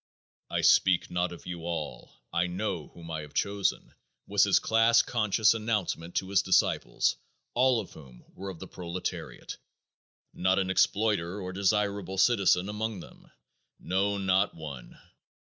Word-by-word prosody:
"I - - -1
speak 95 -2 +4
not 90 0 0
of 85 - -11
you 85 -2 -6
all; 80 -7 -5 0.2
I 85 +1 +1
know 90 -3 -3
whom 85 -1 -11
I 80 -1 -3
have 75 -1 -12
chosen," 100 -1 -1 0.3
was - - +3
his - - +4
class 115 +1 +4
conscious 110 -1 +2
announcement 105 -7 -2
to 95 - -1
his 100 -1 +3
disciples, 95 -1 +1 0.4
all 125 -1 +3
of 105 - -7
whom 65 -5 -14
were 95 +1 -7
of 95 - -7
the - - -9
proletariat, 90 0 -6 0.8
not 95 +1 +1
an 95 -1 0
exploiter 100 -2 +1
or 90 -1 -5
desirable 100 -1 0
citizen 95 -3 +3
among 105 -1 -3
them. - - -15 0.5
No, 100 +2 0
not 95 +1 +1
one! 75 -6 -9
95 Hz, 145 wpm, -28 LUFS, 85-105 Hz, 0.8 s, speak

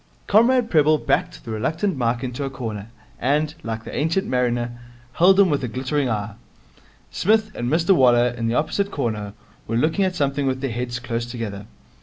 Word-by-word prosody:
Comrade 235 +3 +3
Prebble 155 -1 +4
backed 170 +1 -1
the 115 - -6
reluctant 160 - -1
Mike 120 -1 -1
into 125 +2 -4
a 135 - -2
corner, 110 -6 -6 0.3
and, 150 +4 +1
like 115 0 -5
the - - -8
Ancient 165 +6 0
Mariner, 120 -3 -1 0.3
held 190 +3 +5
him 190 -4 +5
with 140 -2 0
a - - -1
glittering 130 +3 -1
eye. 105 -1 -2 0.8
Psmith 215 +2 +2
and 120 0 -3
Mr 165 +5 +2
Waller, 125 -3 +5
in 120 -1 -3
the 115 - 0
opposite 160 +7 0
corner, 110 - -3 0.3
were 115 - -1
looking 160 +9 +2
at 185 -1 0
something 140 -3 0
with 130 0 -1
their 135 -2 -2
heads 120 +1 -3
close 120 -1 -4
together. 105 -4 -6
130 Hz, 185 wpm, -22 LUFS, 120-160 Hz, 0.8 s, held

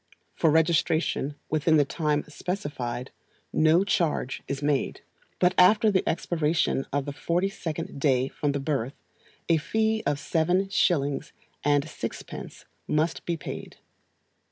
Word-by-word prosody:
For 160 - +2
registration, 160 -2 +2 0.2
within 155 +1 +3
the 145 - +4
time 150 0 0
specified, 145 -7 -4 0.4
no 160 +4 +4
charge 165 -9 0
is 140 +1 -4
made. 145 -2 0 0.4
But 180 0 +3
after 210 +4 +6
the 190 - +3
expiration 160 -4 0
of 140 0 -1
the 145 - -4
forty 175 +6 0
second 160 -7 -5
day 130 -3 +2
from 145 +1 -2
the 140 - -1
birth, 135 -3 -2 0.5
a 165 - +4
fee 220 +7 0
of 145 - +1
seven 180 +6 +1
shillings 145 -7 +1 0.3
and 145 +1 +2
sixpence - - -7 0.2
must 160 +2 0
be 170 -1 0
paid. - - -7
155 Hz, 130 wpm, -27 LUFS, 145-175 Hz, 0.5 s, after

